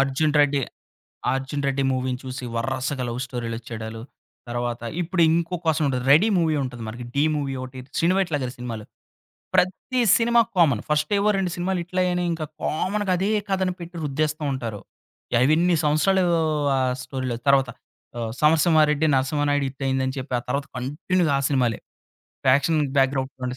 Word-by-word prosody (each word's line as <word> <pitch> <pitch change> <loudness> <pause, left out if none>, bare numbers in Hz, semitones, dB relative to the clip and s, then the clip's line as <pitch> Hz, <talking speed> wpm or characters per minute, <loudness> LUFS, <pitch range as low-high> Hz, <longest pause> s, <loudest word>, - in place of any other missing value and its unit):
'అర్జున్ 140 +3 +1
రెడ్డి' 140 -1 +2 0.7
'అర్జున్ 135 +2 -2
రెడ్డి' 135 0 0
మూవీని 130 -1 -2
చూసి 130 0 -6
వర్రసగా 130 +2 -2
లవ్ 120 +1 -4
స్టోరీలొచ్చేడాలు. 115 -2 -6 0.5
తర్వాత 120 0 -3 0.2
ఇప్పుడు 175 +1 0
ఇంకో 170 +1 0
అవకాశం 160 -2 0
ఉంటది. 125 -2 -1
'రెడీ' 185 +10 +6
మూవీ 160 -3 +2
ఉంటది 125 -2 -6
మనకి, 120 +3 -6
'డీ' 140 +2 +2
మూవీ 140 -2 -2
ఒకటి, 130 0 -9 0.2
'శ్రీను 175 +3 +3
వైట్ల' 170 -6 0
గారి 125 0 -4
సినిమాలు. 115 -3 -6 0.7
ప్రతి 195 +8 +1 0.2
సినిమా 235 0 +4 0.2
కామన్, 140 -11 +3
ఫస్ట్ 150 +4 0
ఏవో 205 +1 +2
2 190 -2 0
సినిమాలు 180 +1 -1
హిట్లయ్యాయి 180 +1 0
అని 180 - 0
ఇంకా 160 -2 -3 0.2
కామన్‌గా 195 +4 -1
అదే 195 +3 0 0.2
కథను 190 -1 0
పెట్టి 170 0 -8
రుద్దేస్తూ 155 +2 -1
ఉంటారు. 115 -6 -4 0.6
ఆ - - +2 0.2
ఎన్ని 175 +1 +3
సంవత్సరాలు, 180 +6 +3 0.5
ఆ - - +1 0.2
స్టోరీలో 130 -3 -4
తర్వాత. 135 -2 +4 0.5
ఆహ్, 115 -1 -3
'సమరసింహ 155 +1 +5
రెడ్డి', 155 +1 +1
'నరసింహానాయుడు' 145 +1 +1
హిటయింది 135 -1 -1
అని 130 - -3
చెప్పి, 130 0 -6
ఆ - - -14
తర్వాత 140 0 -1
కంటిన్యూగా 155 +4 0
ఆ - - -1
సినిమాలే. 125 -5 +1 0.7
ఫ్యాక్షన్‌‌ 145 +4 +3
బ్యాక్‌‌‌డ్రాప్ 135 0 +2
వంటి 125 0 -3
140 Hz, 160 wpm, -24 LUFS, 130-170 Hz, 0.7 s, రెడీ